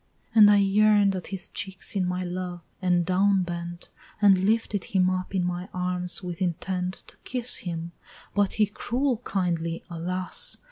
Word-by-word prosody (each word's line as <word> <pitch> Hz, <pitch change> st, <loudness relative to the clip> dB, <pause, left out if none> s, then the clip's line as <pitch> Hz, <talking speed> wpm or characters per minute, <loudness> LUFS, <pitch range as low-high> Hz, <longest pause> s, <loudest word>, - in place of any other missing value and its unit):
And 215 Hz, -2 st, +8 dB
I 205 Hz, -, +6 dB
yearn'd 205 Hz, 0 st, +4 dB
at 185 Hz, -, -5 dB
his 195 Hz, -2 st, -4 dB
cheeks 190 Hz, +1 st, -4 dB
in 185 Hz, -2 st, +1 dB
my 180 Hz, 0 st, -2 dB
love, 180 Hz, 0 st, -5 dB, 0.2 s
and 180 Hz, -2 st, +2 dB
down 190 Hz, +1 st, +3 dB
bent, 175 Hz, 0 st, -6 dB, 0.3 s
And 195 Hz, -3 st, +5 dB
lifted 215 Hz, -2 st, 0 dB
him 185 Hz, -1 st, +2 dB
up 185 Hz, +1 st, -3 dB
in 185 Hz, -, +1 dB
my 180 Hz, +2 st, -3 dB
arms 180 Hz, 0 st, -1 dB
with 180 Hz, 0 st, -6 dB
intent 180 Hz, +1 st, -2 dB
To -, -, -15 dB
kiss 250 Hz, -1 st, +2 dB
him, 170 Hz, -1 st, -5 dB, 0.4 s
but 205 Hz, -1 st, +1 dB
he 215 Hz, -, +3 dB
cruel 245 Hz, +5 st, -1 dB
kindly, 170 Hz, -7 st, -2 dB
alas! 180 Hz, +2 st, 0 dB
185 Hz, 160 wpm, -26 LUFS, 180-200 Hz, 0.4 s, And